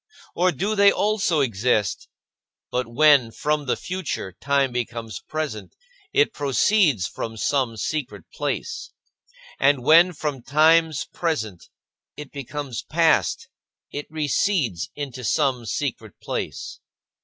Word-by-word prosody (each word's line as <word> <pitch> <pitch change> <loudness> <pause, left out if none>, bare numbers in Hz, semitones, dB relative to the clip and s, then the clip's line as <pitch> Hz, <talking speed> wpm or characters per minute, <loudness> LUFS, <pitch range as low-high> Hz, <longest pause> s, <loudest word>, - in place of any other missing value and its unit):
Or 180 +1 +2
do 205 +5 -1
they 200 -1 +6
also 205 -6 +1
exist; 110 -4 0 0.6
but 125 -1 -1
when, 140 0 +5
from 150 +4 -1
the - - +2
future, 180 - -4
time 140 -2 +1
becomes 115 -4 -4
present, 150 -10 -5 0.4
it 425 +1 +3
proceeds 140 - +2
from 115 -1 -5
some 125 0 0
secret 110 - -3
place; - - -3 0.7
and 135 -2 +3
when, 170 +6 +6
from 150 -4 -4
times 155 +1 +3
present, 110 - -3 0.5
it 150 -2 -8
becomes 140 -2 -5
past, 165 0 +2 0.4
it 145 - -5
recedes 150 - 0
into 135 -3 -6
some 125 0 0
secret 110 -3 -3
place? - - -5
140 Hz, 115 wpm, -23 LUFS, 120-160 Hz, 0.7 s, they